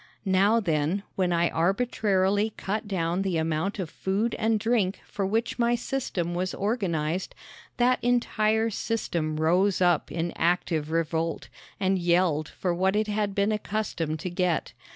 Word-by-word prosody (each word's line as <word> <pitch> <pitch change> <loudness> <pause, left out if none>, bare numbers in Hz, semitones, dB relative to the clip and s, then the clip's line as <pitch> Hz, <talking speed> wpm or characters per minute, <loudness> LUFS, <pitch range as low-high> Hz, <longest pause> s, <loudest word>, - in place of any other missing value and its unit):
Now, 200 +4 +4
then, 165 0 0
when 185 -2 +1
I 170 0 +2
arbitrarily 200 +1 +1
cut 210 +2 -3
down 175 -2 -1
the 190 -4 0
amount 160 +5 -1
of 185 -4 -3
food 200 +8 -1
and 220 0 +2
drink 215 -4 +1
for 195 -2 -3
which 225 +4 -1
my 240 0 +3
system 230 -9 -2
was 185 +1 -2
organized 185 -6 -1 0.4
that 250 0 +2
entire 225 -2 +2
system 175 -8 -2
rose 180 +5 +2
up 175 -4 +2
in 170 0 -2
active 165 -2 0
revolt 165 0 -1 0.3
and 190 -1 +1
yelled 170 -3 +2
for 180 -2 -2
what 190 +3 +1
it 215 0 +1
had 205 -1 -1
been 200 +1 +2
accustomed 205 -7 -2
to 180 - -4
get. 175 -2 0
190 Hz, 150 wpm, -27 LUFS, 170-215 Hz, 0.4 s, Now